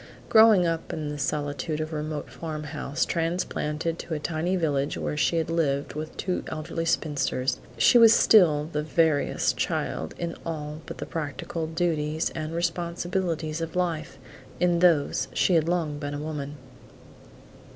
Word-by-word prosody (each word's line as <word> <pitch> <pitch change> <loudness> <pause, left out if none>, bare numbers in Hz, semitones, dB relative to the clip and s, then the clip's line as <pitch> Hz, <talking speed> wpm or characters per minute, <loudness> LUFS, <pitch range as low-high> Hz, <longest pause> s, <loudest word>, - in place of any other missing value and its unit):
Growing 220 -5 +7
up 165 -1 -2
in 155 -2 -4
the 150 - -4
solitude 145 +2 -2
of 155 +1 -4
a - - -2
remote 150 0 -4
farm 155 -2 -6
house, 150 -1 -2
transplanted 165 -1 -2
to 165 - -4
a - - -3
tiny 160 +5 -1
village 145 -5 0
where - - -2
she 165 +2 +2
lived 150 -4 -1
with 155 +1 -6
two 185 -1 -2
elderly 160 +1 -4
spinsters, 135 -5 0 0.2
she 240 - +6
was 230 -1 +9
still 165 -10 +5
the 150 - 0
veriest 155 -1 +1
child 80 - -2
in 170 -1 -3
all 155 -1 -5
but - - -7
the - - -5
practical 155 +1 -4
duties 160 -2 -1
and 155 +1 -5
responsibilities 170 -1 -2
of 165 +1 -4
life; 170 -3 -2 0.4
in 175 -1 +3
those 170 -5 +3
she 185 - +3
had 165 -1 +3
long 160 -4 -1
been 145 -1 -4
a - - -4
woman. 150 -1 -5
160 Hz, 155 wpm, -26 LUFS, 150-170 Hz, 0.4 s, was